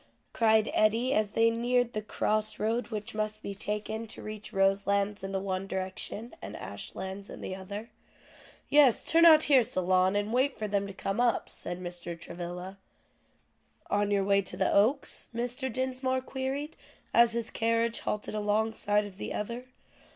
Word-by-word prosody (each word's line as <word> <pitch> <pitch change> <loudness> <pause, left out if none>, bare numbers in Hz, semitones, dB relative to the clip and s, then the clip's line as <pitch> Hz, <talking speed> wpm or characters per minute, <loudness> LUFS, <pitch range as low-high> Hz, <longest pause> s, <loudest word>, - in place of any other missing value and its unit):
cried 220 -1 +4
Eddie 225 +5 +3
as 215 -4 +2
they 225 +2 +3
neared 245 +1 +1
the 215 - -2
cross 215 0 -1
road 225 +3 0
which 210 -2 -5
must 215 0 -3
be 200 - -4
taken 210 +2 -4
to - - -8
reach 215 -1 -7
Roselands 200 +1 +1
in 195 - -4
the 195 - -1
one 190 0 -3
direction, 190 +4 -4
and - - -7
Ashlands 190 +1 -7
in - - -8
the 185 - -4
other. 200 +4 -7 0.8
"Yes, 285 -5 +5
turn 330 +1 +5
out 315 -1 +8
here, 275 -3 +6
Solon, 185 -4 +2
and 205 +2 -1
wait 260 +2 +2
for 215 - -3
them 200 -1 0
to 200 - -7
come 195 +4 -2
up," 240 -2 +1
said 175 - -5
Mr. 175 -1 -6
Travilla. 180 +3 -7 1.1
"On 205 0 +2
your 200 -1 +2
way 200 0 +3
to 190 - -4
the - - +2
Oaks?" 240 +8 +2
Mr. 245 +2 -2
Dinsmore 260 +1 -1
queried 270 +3 -4 0.4
as 235 -1 +6
his 230 -1 -2
carriage 230 0 +1
halted 210 0 -3
along 215 +1 +1
side 210 -1 +1
of 200 -1 -11
the - - -4
other. 235 +4 -4
215 Hz, 170 wpm, -29 LUFS, 200-235 Hz, 1.1 s, out